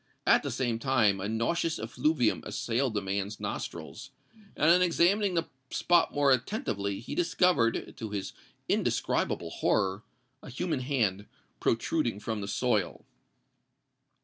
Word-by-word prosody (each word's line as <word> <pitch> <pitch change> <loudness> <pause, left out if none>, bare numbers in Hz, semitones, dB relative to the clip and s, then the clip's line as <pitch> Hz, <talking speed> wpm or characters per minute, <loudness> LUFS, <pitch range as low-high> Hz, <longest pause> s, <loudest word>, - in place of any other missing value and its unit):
At - - +5
the - - -4
same 120 -3 -1
time 115 -7 +2
a 100 +2 -3
nauseous 160 +9 0
effluvium 125 +2 0
assailed 115 +3 -1
the 105 - -1
man's 100 +2 -3
nostrils; - - -6 0.5
and, 155 - +5
on 180 +1 +5
examining 180 +3 +3
the 165 -1 0 0.2
spot 175 -1 +2
more 145 -1 +3
attentively, 110 - -1
he - - -7
discovered—to 145 - +1
his 100 -2 -4 0.3
indescribable - - 0
horror—a 120 +8 -2
human 155 +3 -2
hand 110 -7 -1 0.3
protruding 115 -1 0
from 110 0 -3
the 100 - -5
soil! 100 - -1
120 Hz, 120 wpm, -29 LUFS, 105-155 Hz, 0.5 s, At